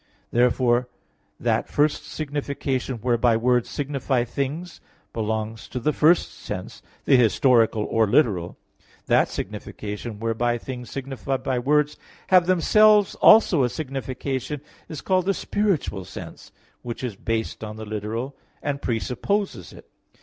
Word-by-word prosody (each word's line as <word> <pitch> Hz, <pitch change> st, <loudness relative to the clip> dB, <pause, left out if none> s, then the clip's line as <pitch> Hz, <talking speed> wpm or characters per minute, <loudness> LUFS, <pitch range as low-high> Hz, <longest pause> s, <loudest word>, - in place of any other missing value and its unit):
Therefore 125 Hz, 0 st, +2 dB, 0.5 s
that -, -, 0 dB
first 150 Hz, +1 st, +1 dB
signification 140 Hz, -3 st, -3 dB
whereby 120 Hz, 0 st, +2 dB
words 120 Hz, 0 st, +1 dB
signify 135 Hz, -3 st, -1 dB
things 140 Hz, +8 st, -4 dB, 0.3 s
belongs 110 Hz, 0 st, -3 dB
to 125 Hz, -, -4 dB
the 150 Hz, +5 st, 0 dB
first 160 Hz, +5 st, +3 dB
sense, -, -, -7 dB, 0.2 s
the 135 Hz, -, +5 dB
historical 115 Hz, -2 st, +3 dB
or 110 Hz, 0 st, +1 dB
literal. 100 Hz, -, +1 dB, 0.5 s
That -, -, +3 dB
signification 105 Hz, +1 st, -6 dB
whereby 115 Hz, +1 st, 0 dB
things 125 Hz, 0 st, -7 dB
signified 135 Hz, 0 st, -4 dB
by 130 Hz, -2 st, 0 dB
words 150 Hz, +3 st, +1 dB, 0.3 s
have 180 Hz, -2 st, +5 dB
themselves 210 Hz, +3 st, +5 dB
also 190 Hz, -8 st, +6 dB
a 125 Hz, -, +2 dB
signification 135 Hz, 0 st, -4 dB, 0.3 s
is 155 Hz, -, -6 dB
called 185 Hz, -1 st, +1 dB
the 195 Hz, -, +2 dB
spiritual 185 Hz, -, -1 dB
sense, 90 Hz, -2 st, -10 dB, 0.3 s
which 120 Hz, +1 st, -6 dB
is 120 Hz, -5 st, -3 dB
based 115 Hz, +2 st, -3 dB
on 105 Hz, 0 st, -6 dB
the 110 Hz, 0 st, -7 dB
literal, 110 Hz, +5 st, -4 dB, 0.3 s
and 140 Hz, -1 st, -2 dB
presupposes 135 Hz, -, -2 dB
it. -, -, -14 dB
125 Hz, 130 wpm, -24 LUFS, 115-145 Hz, 0.5 s, also